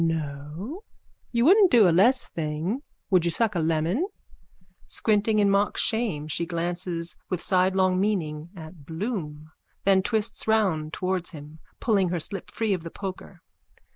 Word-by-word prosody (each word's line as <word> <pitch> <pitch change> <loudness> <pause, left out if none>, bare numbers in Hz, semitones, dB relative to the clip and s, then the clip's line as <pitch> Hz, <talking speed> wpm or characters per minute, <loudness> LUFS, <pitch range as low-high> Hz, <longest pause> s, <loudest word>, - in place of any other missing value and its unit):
_ - - +3
No? 160 - -4 0.5
You 235 0 +2
wouldn't 385 +3 +7
do 230 - +6
a - - +4
less 240 +9 +4
thing. 160 - -3 0.3
Would 185 -3 +4
you 170 - +1
suck 220 +4 +1
a 175 - -1
lemon? 165 - 0 0.8
_(Squinting 215 0 +1
in 200 -1 +4
mock 200 +1 +1
shame 210 -10 0
she 165 +2 -2
glances 170 0 -3
with 180 - -1
sidelong 185 0 +2
meaning 165 -6 -1
at 160 -2 -11
Bloom, 160 - -5 0.3
then 190 -1 +4
twists 220 +2 -1
round 185 -9 +1
towards 185 0 -2
him, 150 0 -11 0.2
pulling 200 -6 +2
her 175 0 -1
slip 185 +4 -3
free 220 -3 0
of 180 - -2
the 165 - -6
poker. 185 -1 -8
185 Hz, 155 wpm, -26 LUFS, 160-210 Hz, 0.8 s, wouldn't